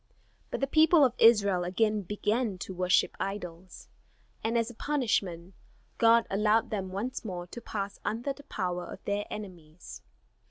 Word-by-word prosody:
But - - -4
the - - +3
people 310 +1 +5
of 250 - +1
Israel 200 -5 +5
again 210 +4 +1
began 210 +2 -1
to 190 - -6
worship 180 0 +2
idols; 185 -2 -6 0.6
and 230 +1 +1
as 230 0 0
a - - -13
punishment 200 - -1 0.5
God 230 0 +5
allowed 210 +3 +2
them 195 -3 -3
once 230 +9 -4
more 180 -5 -5
to 235 +7 -9
pass 200 -3 -5
under 235 +6 -2
the 285 - -14
power 180 -9 -3
of - - -10
their 205 +1 -1
enemies. 175 -5 -9
210 Hz, 155 wpm, -29 LUFS, 185-230 Hz, 0.6 s, people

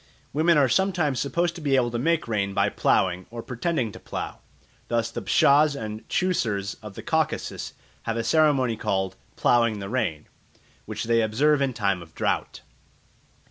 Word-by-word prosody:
Women 160 +3 +4
are 140 -2 +5
sometimes 165 -3 +1
supposed 170 +5 0
to 170 - -9
be 140 -3 +2
able 120 -2 +2
to 120 - -2
make 165 +3 +1
rain 100 -3 -1
by - - +3
ploughing, 90 -1 +1
or 115 0 -7
pretending 125 -2 -2
to - - -11
plough. - - -6 0.5
Thus 115 -1 0
the 120 - -5
Pshaws 145 +8 +4
and 110 -3 -6
Chewsurs 110 - 0
of 105 -2 -9
the - - -8
Caucasus - - -1 0.4
have 115 - -1
a 115 - -1
ceremony 140 -5 +3
called 95 -2 -1 0.2
"ploughing 115 -3 +3
the 100 -1 -6
rain," 80 -12 -1 0.6
which - - -4
they 115 0 +2
observe 140 +7 +2
in 135 -1 +1
time 100 -5 0
of 85 -1 -14
drought. - - -1
120 Hz, 170 wpm, -25 LUFS, 105-150 Hz, 0.6 s, are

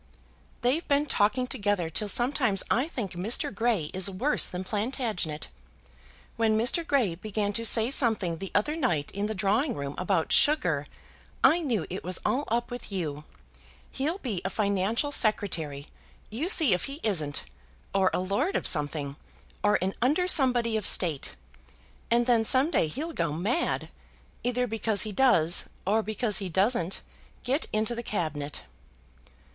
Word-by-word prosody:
"They've 270 +7 +1
been 285 +1 +2
talking 250 -1 +1
together 205 -9 -1
till 165 +6 -3
sometimes 240 -3 +2
I 255 +5 +2
think 235 - -4
Mr. 195 +7 0
Grey 205 -7 0
is 190 +1 +1
worse 240 +11 +1
than 180 +1 -5
Plantagenet. 210 - -3 0.9
When 220 -1 +2
Mr. 250 +9 +1
Grey 270 - +1
began 205 +3 -3
to 230 - -2
say 230 +1 +4
something 215 - +1
the 195 - -5
other 255 +10 +1
night 175 - -1
in 200 +1 -2
the 220 - -4
drawing 210 +9 0
room 140 0 -5
about 180 -3 0
sugar, 175 - +3 0.6
I 340 - +6
knew 245 - -1
it 185 - -5
was 180 0 -2
all 280 +3 0
up 235 +2 -1
with 245 -3 -6
you. 155 -6 -4 0.7
He'll 305 +7 -2
be 230 - -4
a 190 - -1
financial 200 +7 0
Secretary; 165 - 0 0.4
you 280 - -2
see 320 - +7
if 180 - -1
he 275 +2 -6
isn't; 155 -9 -1 0.5
or 190 -1 +3
a - - -1
lord 205 - -1
of - - -1
something, 145 -2 -1 0.5
or 210 0 +4
an 190 +1 -1
under 300 +9 +2
somebody 245 -8 +3
of 215 - 0
State; 155 - +1 0.7
and 235 +1 +3
then 235 -2 +3
some 260 +7 +4
day 165 - +2
he'll 310 - -5
go - - -1
mad, 210 - -1 0.6
either 250 0 +1
because 220 -3 +1
he 215 - -4
does 190 -8 +3 0.2
or 215 +4 +2
because 215 0 0
he 195 -2 -4
doesn't 190 0 0 0.4
get 270 +5 0
into 215 +2 0
the 235 - -4
Cabinet." 155 -9 -4
215 Hz, 160 wpm, -27 LUFS, 185-250 Hz, 0.9 s, see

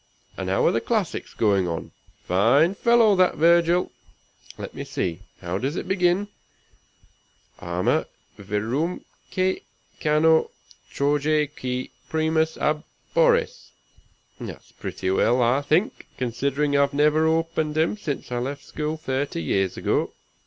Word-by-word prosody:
and - - -4
how - - +2
are - - +5
the - - 0
classics 215 -7 -2
going 100 -4 +2
on? 85 -1 -4 0.3
Fine 120 - +3
fellow, 230 -1 +4
that 185 -1 +3
Virgil! 170 +2 +3 0.7
Let - - -7
me - - -6
see, 85 -1 -3 0.2
how 90 +1 -3
does 135 +7 -2
it - - -4
begin? 190 +1 +2 1.3
'Arma, 85 +1 0 0.3
virumque 135 - -2 0.4
cano, 160 +1 +3 0.4
Trojae 150 +2 +1
qui 125 0 -4 0.2
primus 160 0 +1
ab 150 0 0 0.3
oris.' - - +2 0.7
That's - - -9
pretty 95 - -4
well, 120 +6 +3
I 125 +3 +3
think, 175 - 0
considering 140 +4 -1
I've 140 0 +2
never 150 +2 +3
opened 160 -1 0
him 160 +5 +2
since 150 -11 -5
I 120 - -1
left 140 +3 -5
school 155 +1 -3
thirty 135 - -3
years 95 +4 0
ago. - - 0
150 Hz, 125 wpm, -24 LUFS, 125-170 Hz, 1.3 s, are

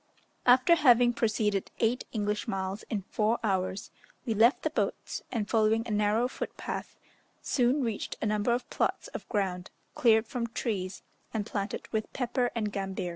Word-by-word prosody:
After 255 +6 +6
having 245 -6 +5
proceeded 210 -4 0
eight 235 +2 +1
English 210 +1 -1
miles 195 0 -2
in 205 -4 -2
four 220 +2 +2
hours, 190 -1 -1 0.3
we 225 - 0
left 230 +5 +4
the - - 0
boats, - - -2
and 220 -4 -1
following 225 +1 +2
a - - -4
narrow 210 +3 +2
footpath, - - -6 0.5
soon 260 +2 +2
reached 225 -4 -3
a - - -2
number 210 +2 +1
of 245 +1 0
plots - - -1
of - - -8
ground, 190 -4 -1 0.2
cleared 220 -1 +4
from 235 0 -3
trees, 200 -6 -3 0.3
and 210 -2 -1
planted 200 -1 -4
with 220 -1 -1
pepper 250 -1 0
and 210 -3 -1
gambir. 190 -2 -3
220 Hz, 160 wpm, -29 LUFS, 205-240 Hz, 0.5 s, After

